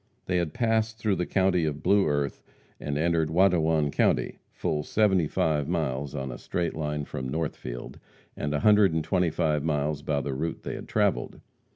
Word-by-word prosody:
They 90 - 0
had 85 -3 -2
passed 110 -1 +1
through 105 -4 0
the 90 - -1
county 95 -2 +2
of 75 -1 -2
Blue 100 0 +4
Earth, 70 -2 -1 0.4
and 75 -1 -3
entered 80 0 +1
Watonwan 80 -4 +3
county, - - +1
full 75 - -2
seventy 95 -1 +2
five 75 -2 0
miles 70 -4 -2
on 65 -2 -4
a - - -8
straight 85 -1 -2
line 75 -1 -3
from 65 -2 -5
Northfield, 70 -5 -5 0.4
and 75 - -3
a 75 - -1
hundred 105 -4 +5
and 80 - 0
twenty 90 +2 +1
five 75 -3 0
miles 75 -1 -1
by 70 -1 -1
the 70 0 -3
route 80 +5 -3
they - - -4
had - - -7
travelled. - - 0
80 Hz, 185 wpm, -27 LUFS, 75-90 Hz, 0.4 s, hundred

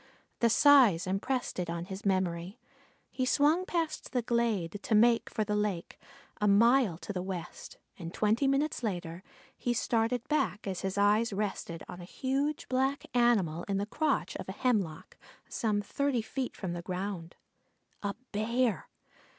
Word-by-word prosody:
The 235 - +4
size 240 - +6
impressed 200 +6 -2
it 175 - -2
on 170 0 -3
his 190 +2 -5
memory. 185 +1 -1 0.5
He 260 - -2
swung 300 +7 +3
past 325 -5 -2
the 245 -2 +1
glade 220 -6 0
to 220 - 0
make 230 +2 +4
for 215 - -1
the 210 0 -1
lake, 205 -5 -2 0.4
a 210 - +1
mile 230 -2 +4
to 205 - -6
the 180 - -2
west, 185 -2 -7 0.2
and 165 0 -6
twenty 220 +8 +1
minutes 275 +2 +1
later 175 -6 -4 0.3
he 240 -1 -1
started 230 +1 0
back 300 -8 0
as 190 -2 -3
his 190 0 -3
eye 205 +2 +4
rested 195 -5 -3
on 180 - -8
a - - -8
huge 275 +8 -2
black 265 +2 0
animal 215 -10 +3
in 200 -1 0
the 200 - -1
crotch 310 +8 -1
of - - -8
a - - -3
hemlock, 205 -11 -1 0.3
some 210 -2 -1
thirty 275 +1 -1
feet 255 +3 -4
from 185 -3 -4
the 175 - -4
ground. 180 -1 -5 0.7
A 200 -1 -2 0.2
Bear! 230 +2 0
210 Hz, 160 wpm, -30 LUFS, 185-250 Hz, 0.7 s, size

